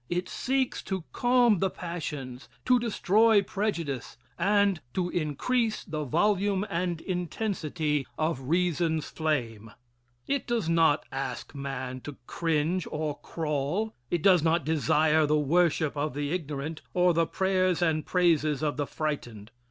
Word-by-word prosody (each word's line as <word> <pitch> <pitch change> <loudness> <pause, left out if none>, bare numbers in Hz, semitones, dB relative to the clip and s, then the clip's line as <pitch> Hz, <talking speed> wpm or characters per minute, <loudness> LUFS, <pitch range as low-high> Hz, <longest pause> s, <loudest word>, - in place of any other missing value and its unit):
It 180 +1 -1
seeks 265 -1 -1
to 190 -3 -3
calm 245 -5 +4
the 190 - +2
passions, 150 -8 -6 0.2
to 250 -1 +5
destroy 220 -1 +3
prejudice 170 - -3 0.2
and 200 -1 +2
to 180 -1 0
increase 215 - 0
the 155 -4 -4
volume 200 - +1
and 170 -1 -1
intensity 170 -5 -2
of 155 -3 -1
reason's 170 -2 +1
flame. 120 -9 -2 0.6
It 280 0 -1
does 235 -7 0
not 165 -3 +3
ask 135 +1 -5
man 130 -2 -5
to 145 +1 -8
cringe 165 +3 0
or 150 -1 -3
crawl. 160 +7 -2 0.2
It 170 -2 -1
does 185 -4 +6
not 160 -1 +1
desire 155 0 +3
the 150 +1 +3
worship 155 0 +2
of 145 -1 -2
the 145 0 -2
ignorant 155 -2 -4
or 180 -1 +4
the 165 0 +2
prayers 185 -2 +1
and 155 -2 +1
praises 155 -5 +2
of 150 -2 0
the 145 -1 -1
frightened. 120 -9 -4
165 Hz, 135 wpm, -28 LUFS, 150-185 Hz, 0.6 s, does